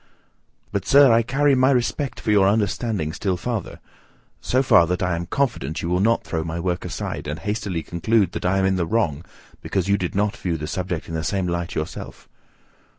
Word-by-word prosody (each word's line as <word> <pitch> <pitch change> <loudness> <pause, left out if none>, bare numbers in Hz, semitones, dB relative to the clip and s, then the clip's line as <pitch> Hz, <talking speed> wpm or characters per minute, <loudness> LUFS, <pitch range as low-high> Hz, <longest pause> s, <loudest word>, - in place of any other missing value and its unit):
But, - - -3
sir, 140 -2 +7
I 115 - +5
carry 140 +5 +2
my 130 0 +4
respect 135 +2 0
for 110 - -1
your 100 -2 +5
understanding 100 -4 0
still 95 0 -1
farther: 115 0 -4 0.6
so 130 +2 +1
far, 85 -10 +5
that 90 +1 -1
I 90 -1 0
am 85 0 -4
confident 110 - -1
you 85 - -2
will 90 +1 +1
not 115 +4 +2
throw 80 -2 -3
my 80 +1 -4
work 90 0 -2
aside, - - -5
and 75 +2 -3
hastily 95 -1 -3
conclude 95 +4 +1
that - - -5
I 90 +2 +2
am 95 - +2
in 95 0 +2
the 85 -2 -1
wrong 85 -9 0 0.4
because 95 -2 -2
you 100 0 +3
did 90 0 -3
not 105 +1 +1
view 85 -3 -2
the 75 - -5
subject 90 0 -3
in 80 - -7
the 80 0 -2
same 95 +2 -1
light 85 -1 -3
yourself. 80 - -6
95 Hz, 210 wpm, -22 LUFS, 85-115 Hz, 0.6 s, sir